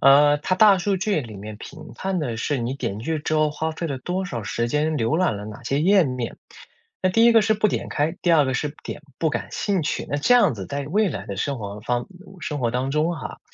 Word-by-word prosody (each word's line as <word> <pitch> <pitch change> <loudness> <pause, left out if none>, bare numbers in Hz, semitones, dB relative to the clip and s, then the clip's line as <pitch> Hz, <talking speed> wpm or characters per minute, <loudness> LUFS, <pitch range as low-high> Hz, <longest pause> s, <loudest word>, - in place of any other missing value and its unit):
啊， 145 +2 +6
它 185 +5 0
大 200 -1 +6
数 195 +2 0
据 195 -2 0
里 115 -6 -9
面 105 +1 -8
评 155 - -10
判 190 -1 -2
的 120 -7 -3
是 145 +5 0
你 120 +1 -2
点 120 -7 -3
进 105 - -7
去 160 0 -1
之 155 +1 -2
后 155 -1 +3
花 160 +2 -2
费 165 +1 -4
了 135 -4 -3
多 180 +7 -2
少 120 -10 -4
时 115 +3 -1
间， 150 +5 0
浏 145 +6 +1
览 170 - +2
了 105 - -7
哪 105 0 -9
些 140 - -1
页 190 0 +5
面。 125 -3 -4 0.6
那 185 - +3
第 225 +4 +5
一 235 - +7
个 225 -2 +6
是 220 - +3
不 215 0 +2
点 - - -3
开， 155 +4 0
第 175 - +3
二 150 -4 +5
个 130 - -1
是 150 - -1
不 145 - -12
点 - - -7 0.2
“不 160 - +3
感 - - -3
兴 195 -4 0
趣”。 150 - -2
那 145 - -1
这 245 +12 +4
样 200 - +5
子 95 -3 -7
在 140 0 -3
未 195 +5 +1
来 100 -5 -6
的 100 -3 -5
生 140 +6 -2
活 105 -1 -6
方 120 +1 -1
嗯， 185 0 -15
生 150 -2 -3
活 120 -3 0
当 125 +3 -1
中 155 +4 +1
哈， 155 - -7
150 Hz, 295 characters per minute, -23 LUFS, 125-180 Hz, 0.6 s, 一